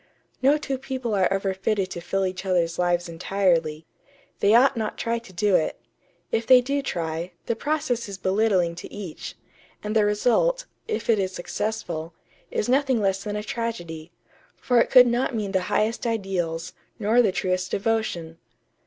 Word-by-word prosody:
No 275 Hz, +3 st, +5 dB
two 270 Hz, -3 st, -3 dB
people 260 Hz, -4 st, -3 dB
are 190 Hz, -2 st, +2 dB
ever 195 Hz, 0 st, 0 dB
fitted 190 Hz, 0 st, -1 dB
to 175 Hz, -, -5 dB
fill 195 Hz, +2 st, -1 dB
each 185 Hz, 0 st, -4 dB
other's 175 Hz, -3 st, 0 dB
lives 175 Hz, 0 st, +1 dB
entirely. 165 Hz, -3 st, 0 dB, 0.5 s
They 205 Hz, +2 st, +4 dB
ought 265 Hz, +3 st, +5 dB
not 220 Hz, -2 st, -3 dB
to -, -, -4 dB
try 235 Hz, 0 st, 0 dB
to 230 Hz, -4 st, -15 dB
do 200 Hz, +3 st, +1 dB
it. 155 Hz, -, 0 dB, 0.5 s
If 225 Hz, 0 st, 0 dB
they 255 Hz, -1 st, +9 dB
do 280 Hz, +3 st, -1 dB
try, 170 Hz, -6 st, -3 dB
the 230 Hz, -, -1 dB
process 250 Hz, -5 st, -1 dB
is 195 Hz, -, -6 dB
belittling 190 Hz, -2 st, +2 dB
to -, -, -8 dB
each, 190 Hz, -6 st, -7 dB, 0.5 s
and 210 Hz, +1 st, -3 dB
the 215 Hz, -, +5 dB
result, 250 Hz, -, +2 dB, 0.2 s
if 440 Hz, -, -3 dB
it 225 Hz, -3 st, +3 dB
is 190 Hz, -1 st, -1 dB
successful, 175 Hz, -4 st, -4 dB, 0.3 s
is -, -, -1 dB
nothing 265 Hz, -1 st, +2 dB
less 195 Hz, -1 st, 0 dB
than 210 Hz, -1 st, -4 dB
a 210 Hz, -, -3 dB
tragedy; 175 Hz, -8 st, -5 dB, 0.4 s
for 245 Hz, -2 st, +2 dB
it -, -, +1 dB
could 250 Hz, -1 st, +8 dB
not 240 Hz, +1 st, 0 dB
mean 210 Hz, -3 st, -2 dB
the 190 Hz, -1 st, +1 dB
highest 225 Hz, +3 st, 0 dB
ideals, 185 Hz, -7 st, -2 dB, 0.2 s
nor 225 Hz, +2 st, +3 dB
the 215 Hz, -5 st, +2 dB
truest 185 Hz, 0 st, -1 dB
devotion.... 195 Hz, -7 st, -2 dB
205 Hz, 175 wpm, -25 LUFS, 180-235 Hz, 0.5 s, they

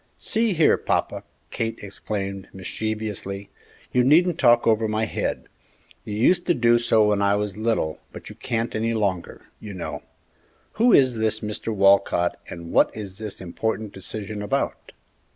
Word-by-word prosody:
"See 225 Hz, -2 st, +1 dB
here, 160 Hz, -1 st, +4 dB
papa!" -, -, -1 dB, 0.3 s
Kate 115 Hz, 0 st, -3 dB
exclaimed, 100 Hz, -1 st, -5 dB
mischievously, 100 Hz, 0 st, -5 dB, 0.4 s
"you 125 Hz, -, +4 dB
needn't 170 Hz, +5 st, +4 dB
talk 120 Hz, -2 st, +5 dB
over 110 Hz, -1 st, +3 dB
my 110 Hz, +1 st, 0 dB
head! -, -, -3 dB, 0.6 s
You 105 Hz, -, -5 dB
used 175 Hz, -, +2 dB
to 175 Hz, -, +3 dB
do 120 Hz, 0 st, +4 dB
so 110 Hz, -2 st, +3 dB
when 105 Hz, -1 st, +1 dB
I 100 Hz, 0 st, +3 dB
was 105 Hz, -2 st, -2 dB
little, 110 Hz, -8 st, -1 dB
but -, -, -10 dB
you -, -, -8 dB
can't 115 Hz, 0 st, -3 dB
any 115 Hz, +1 st, -1 dB
longer, 95 Hz, -5 st, -2 dB
you 105 Hz, -2 st, -8 dB
know. 90 Hz, -, -5 dB, 0.8 s
Who 245 Hz, +1 st, +6 dB
is 130 Hz, -, +4 dB
this 110 Hz, 0 st, 0 dB, 0.3 s
'Walcott,' 100 Hz, -4 st, +3 dB
and 85 Hz, -1 st, -8 dB
what -, -, +4 dB
is 100 Hz, -2 st, -8 dB
this 110 Hz, -2 st, -7 dB
important 110 Hz, +3 st, -3 dB
decision 105 Hz, +2 st, -6 dB
about?" 105 Hz, -, -2 dB
110 Hz, 150 wpm, -23 LUFS, 100-115 Hz, 0.8 s, Who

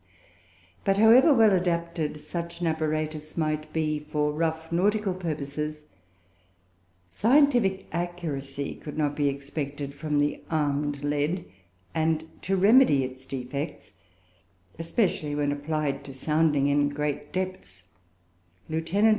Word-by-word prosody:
But, 195 Hz, 0 st, +2 dB
however 235 Hz, +8 st, +7 dB
well 225 Hz, -6 st, +6 dB
adapted 170 Hz, -4 st, -1 dB
such 170 Hz, +1 st, -5 dB
an 175 Hz, -, -1 dB
apparatus 155 Hz, -1 st, -2 dB
might 155 Hz, -1 st, -1 dB
be 155 Hz, -1 st, 0 dB
for 150 Hz, 0 st, -1 dB
rough 160 Hz, +1 st, -2 dB
nautical 200 Hz, +3 st, +2 dB
purposes, 150 Hz, -3 st, -4 dB, 1.2 s
scientific 230 Hz, -, +3 dB
accuracy 155 Hz, -5 st, -3 dB
could 150 Hz, 0 st, -9 dB
not 145 Hz, -2 st, 0 dB
be 145 Hz, -1 st, +1 dB
expected 140 Hz, 0 st, -5 dB
from 150 Hz, 0 st, -2 dB
the 145 Hz, 0 st, +1 dB
armed 145 Hz, -2 st, 0 dB
lead, 150 Hz, +5 st, 0 dB, 0.5 s
and 160 Hz, 0 st, 0 dB
to 195 Hz, -, 0 dB
remedy 200 Hz, -, +6 dB
its 130 Hz, +1 st, -7 dB
defects 135 Hz, +3 st, -5 dB, 0.9 s
(especially 165 Hz, -3 st, 0 dB
when 145 Hz, -1 st, +1 dB
applied 145 Hz, -1 st, -2 dB
to 135 Hz, -, -9 dB
sounding 150 Hz, 0 st, +2 dB
in 145 Hz, 0 st, +3 dB
great 145 Hz, 0 st, -3 dB
depths) 100 Hz, -, -5 dB, 0.8 s
Lieut. 160 Hz, +1 st, -2 dB
155 Hz, 115 wpm, -27 LUFS, 145-170 Hz, 1.2 s, however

